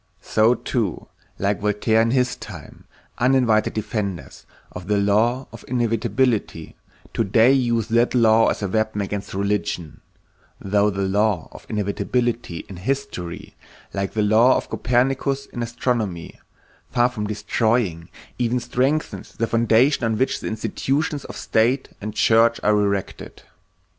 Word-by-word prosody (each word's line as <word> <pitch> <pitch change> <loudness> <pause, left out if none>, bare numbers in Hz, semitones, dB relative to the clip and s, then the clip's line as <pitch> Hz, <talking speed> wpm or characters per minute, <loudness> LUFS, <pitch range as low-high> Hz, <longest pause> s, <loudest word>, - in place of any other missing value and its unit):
So 110 +3 +3
too, 115 -9 -3 0.3
like 100 +1 0
Voltaire 105 +2 +2
in 115 - +2
his 125 0 +1
time, 90 -11 -11 0.3
uninvited 125 -4 +2
defenders 105 -4 -4 0.2
of 90 0 -9
the 105 0 +2
law 110 +6 +1
of 115 - -11
inevitability 115 -6 -1 0.4
today 115 +3 +4
use 120 -5 +1
that 120 +2 +2
law 115 -1 +5
as - - -1
a - - 0
weapon 110 +1 -1
against 100 -1 -5
religion, 100 -5 -2 0.6
though 100 +1 +2
the 100 -1 -2
law 100 -2 0
of - - -13
inevitability 110 -1 -2
in 95 - -9
history, 105 -6 -4 0.4
like 95 -1 -3
the 110 - +1
law 110 +5 +5
of - - -6
Copernicus 135 +3 0
in 120 - -7
astronomy, 115 -7 -3 0.5
far 120 0 +3
from 110 -4 -4
destroying, 105 -5 -1 0.3
even 125 0 +1
strengthens 130 +5 -2
the 115 - 0
foundation 115 +4 +3
on 110 -1 0
which 130 - 0
the - - -5
institutions 135 +7 -2
of - - -8
state 125 +5 +1
and 105 +1 -5
church 115 +1 +4
are - - +4
erected. 100 -2 -2
110 Hz, 135 wpm, -22 LUFS, 100-125 Hz, 0.6 s, law